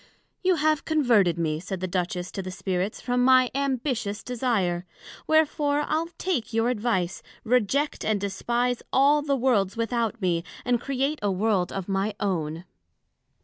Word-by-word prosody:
You 370 -1 +4
have 310 0 +1
converted 235 - +3
me, 155 -2 -1
said 190 +2 -5
the 185 - -2
Duchess 180 0 -2
to 195 - -4
the 185 - -6
Spirits, 185 +2 -2
from 245 0 0
my 255 -1 +5
ambitious 255 -6 -1
desire; 225 -9 0 0.4
wherefore, 295 -2 +2
I'le 320 +2 0
take 270 -12 -2
your 225 +1 +2
advice, 205 -6 -1 0.2
reject 250 +5 +1
and 215 -2 +1
despise 235 +5 -1
all 285 +3 +4
the 285 -1 0
Worlds 230 -6 +1
without 230 0 -1
me, 175 -4 0 0.2
and 245 -1 +1
create 275 +2 -1
a 205 - +1
World 195 -1 +1
of 195 -2 -4
my 200 +1 -1
own. 165 -5 -2
230 Hz, 150 wpm, -26 LUFS, 190-265 Hz, 0.4 s, my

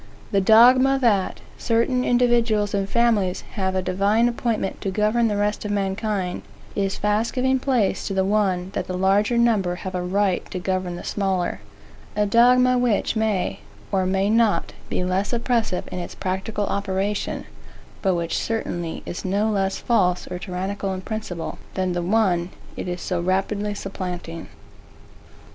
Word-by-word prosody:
The 200 -2 +3
dogma, 250 +6 +6
that 210 -7 +1 0.2
certain 250 +2 +1
individuals 240 -4 +2
and 195 -1 -1
families 220 -6 +2
have 190 -2 -2
a 185 - 0
divine 200 +5 +2
appointment 235 -4 -2
to 195 - -2
govern 215 +4 +2
the 210 -2 -1
rest 205 +1 0
of 210 - -4
mankind, 195 -1 -1 0.3
is 195 -1 -1
fast 210 +2 0
giving 260 +1 +1
place 250 -7 0
to 195 - -3
the 190 0 +2
one 190 -3 +1
that - - -3
the 185 - -3
larger 200 +5 +2
number 215 -7 +2
have 190 +1 -6
a 180 - -1
right 190 +1 +1
to - - -5
govern 185 -1 -2
the - - -8
smaller; 190 -3 -1 0.5
a 210 - +2
dogma, 250 +3 +5
which 235 -3 +1
may, 220 -4 0 0.3
or 190 -2 +1
may 190 +1 +1
not, 225 0 +2 0.2
be - - -1
less 185 +5 -1
oppressive 235 -5 0
in 180 - -4
its 175 - -6
practical 195 +2 -2
operation, 200 +1 -2 0.6
but 190 -3 +2
which 170 -1 -2
certainly 175 -7 -3
is 175 - -5
no 205 +3 +1
less 195 -2 0
false 180 -7 +1
or 180 - -4
tyrannical 190 +1 -3
in 185 - -6
principle, 190 -5 -5 0.2
than 185 -1 0
the 175 - -1
one 180 -2 +1 0.3
it - - -5
is 180 0 -4
so 180 -2 -1
rapidly 200 +3 -1
supplanting. 180 -4 -6
200 Hz, 160 wpm, -23 LUFS, 185-225 Hz, 0.6 s, dogma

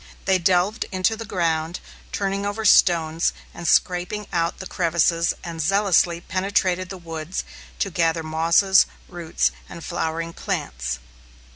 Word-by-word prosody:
They 190 -1 +3
delved 185 +5 +2
into 185 +3 +1
the 225 0 -8
ground, 165 -2 -1 0.3
turning 200 0 -1
over 205 +2 -3
stones 165 -4 +4 0.2
and 170 - -6
scraping 180 +6 +1
out 170 -1 0
the 190 - -8
crevices, 170 -1 +1
and 165 -1 -5
zealously 175 -1 +2
penetrated 185 0 0
the 190 - -6
woods 165 0 -5 0.3
to 195 - -1
gather 165 0 +1
mosses, 165 +5 +4 0.2
roots, 170 -2 -1 0.2
and 170 - -9
flowering 165 +1 -3
plants. - - -3
175 Hz, 130 wpm, -23 LUFS, 165-190 Hz, 0.3 s, stones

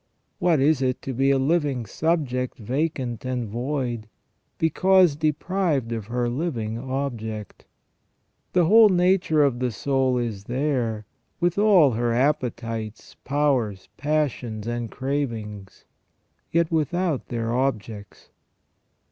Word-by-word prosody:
What 175 -5 +3
is 140 0 +3
it 130 -1 0
to 135 - -4
be 135 +3 +2
a 140 - +4
living 140 -3 0
subject 130 - -1
vacant 125 0 -2
and 125 -2 -2
void, 120 -1 -3 0.5
because 180 0 +4
deprived 155 -3 0
of 110 -3 -4
her 120 +1 -1
living 120 -5 -3
object? 120 -6 -5 0.9
The 180 -2 +4
whole 220 +4 +7
nature 180 -4 +3
of 130 -4 +1
the 125 0 0
soul 130 +2 0
is 110 -5 -3
there, 120 -4 -1 0.3
with 175 +2 +1
all 195 -10 +6
her 120 +1 0
appetites, 115 -4 -2
powers, 130 -9 0
passions, 135 -7 -1
and 120 -1 -3
cravings; 115 -8 -4 0.7
yet 170 0 +1
without 165 -1 0
their 115 -1 -2
objects. 110 -6 -3
130 Hz, 115 wpm, -24 LUFS, 115-155 Hz, 0.9 s, whole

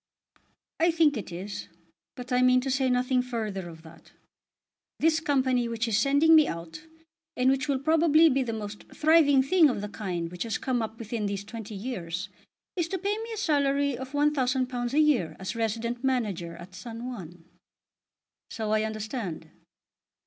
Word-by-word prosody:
"I 335 +2 +4
think 320 -3 +3
it 215 -5 -6
is, 190 +4 -6 0.5
but 250 +1 -9
I 250 - +3
mean 255 0 +5
to 265 +1 -2
say 265 0 +1
nothing 250 0 +2
further 215 -7 -4
of 160 -1 -13
that. 160 0 -16 0.9
This 320 0 +3
Company 260 -5 +1
which 230 0 -2
is 225 - 0
sending 280 +8 +4
me 310 -2 +7
out, 165 - -7 0.5
and 255 +1 +4
which 270 0 0
will 280 -2 +1
probably 315 +2 +4
be 270 -3 +2
the 245 -3 -2
most 210 -2 -6
thriving 300 -4 +5
thing 325 +1 +5
of 245 - -2
the 205 - -4
kind 180 -5 -4
which 180 - -9
has 230 -1 -1
come 250 -2 -1
up 220 0 -5
within 220 -2 -3
these 200 0 -3
twenty 215 0 -8
years, 190 -4 -5 0.5
is 345 -3 0
to 380 - -3
pay 400 +3 -1
me 455 +1 -6
a 445 - -5
salary 280 - +1
of 260 +3 -8
£1000 260 -4 0
a 300 - +3
year 290 - +2
as 190 +5 -4
resident 230 +2 -2
manager 205 -11 -1
at 180 +2 -12
San 230 +4 -8
Juan." 175 -9 -8 1.0
"So 220 -2 -3
I 215 0 +3
understand." 215 - -5
245 Hz, 175 wpm, -27 LUFS, 210-280 Hz, 1.0 s, me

